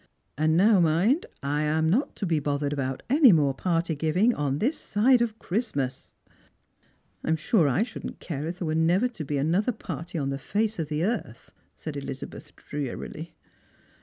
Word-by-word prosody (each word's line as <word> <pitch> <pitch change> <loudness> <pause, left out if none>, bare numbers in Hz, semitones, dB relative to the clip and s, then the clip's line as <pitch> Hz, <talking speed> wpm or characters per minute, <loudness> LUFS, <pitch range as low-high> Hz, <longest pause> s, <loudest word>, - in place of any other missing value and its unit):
"And 155 +2 +2
now 205 +2 +5
mind, 175 - +2 0.2
I 145 +2 0
am 155 +1 +1
not 225 - +1
to 205 - -3
be 165 -4 +1
bothered 145 0 -1
about 135 -2 -3
any 275 -1 +7
more 145 -5 +3
party 165 +2 0
giving 170 +10 +2
on 145 -5 -1
this 260 - +1
side 240 +4 +3
of 225 -2 -1
Christmas." 145 - -3 0.5
" - - -40
I - - -3
am 160 - +4
sure 160 - +2
I 140 - +2
shouldn't 235 - -7
care 155 -2 -4
if 175 +2 -4
there 180 - -4
were 155 - -1
never 170 +8 +3
to 170 -10 -7
he 145 - 0
an 150 +4 +1
other 205 +7 +2
party 170 - -6
on 140 -2 -1
the 135 - -3
face 210 +7 -1
of 160 - -1
the 155 +1 -1
earth," 195 - -3 0.2
said 155 -2 -7
Elizabeth 135 -1 -7
drea' 145 -4 -5
'Jy. 160 +2 -7
160 Hz, 195 wpm, -26 LUFS, 145-205 Hz, 0.5 s, any